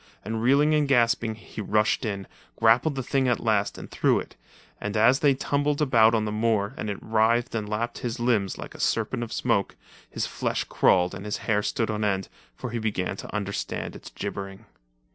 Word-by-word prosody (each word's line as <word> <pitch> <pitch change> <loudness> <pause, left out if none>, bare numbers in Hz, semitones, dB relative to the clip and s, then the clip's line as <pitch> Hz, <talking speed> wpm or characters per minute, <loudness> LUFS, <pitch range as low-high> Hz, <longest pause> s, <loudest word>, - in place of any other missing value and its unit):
And 110 +1 -3
reeling 140 +5 +4
and 150 -1 +2
gasping, 115 -3 +2
he 110 0 -9
rushed 105 +4 +1
in, 100 -3 -3 0.3
grappled 120 +7 +3
the 130 - -3
thing 135 +1 +1
at 125 - +2
last 105 -3 0
and - - -10
threw - - +2
it, - - -9 0.4
and 100 +1 -3
as 120 +5 +5
they 145 -3 +4
tumbled 145 +2 0
about 115 -6 +5
on 110 -1 +1
the 105 - -2
moor 105 -2 0
and 105 - -4
it 100 - -3
writhed 115 +2 +2
and 105 -2 -3
lapped 115 +3 -2
his 120 +1 -4
limbs 115 -6 +1
like - - -8
a - - -12
serpent 115 +2 0
of 115 -1 -5
smoke, 110 -6 0 0.3
his - - -2
flesh - - -2
crawled 90 -1 +3
and 95 - -7
his 105 0 -3
hair 105 -1 +2
stood 110 0 -1
on 105 0 -2
end, 95 -2 0 0.3
for 125 - -6
he 120 - -2
began 100 -4 -2
to - - -8
understand 100 -1 -3
its - - -10
gibbering. 95 0 -6
110 Hz, 200 wpm, -26 LUFS, 105-120 Hz, 0.4 s, as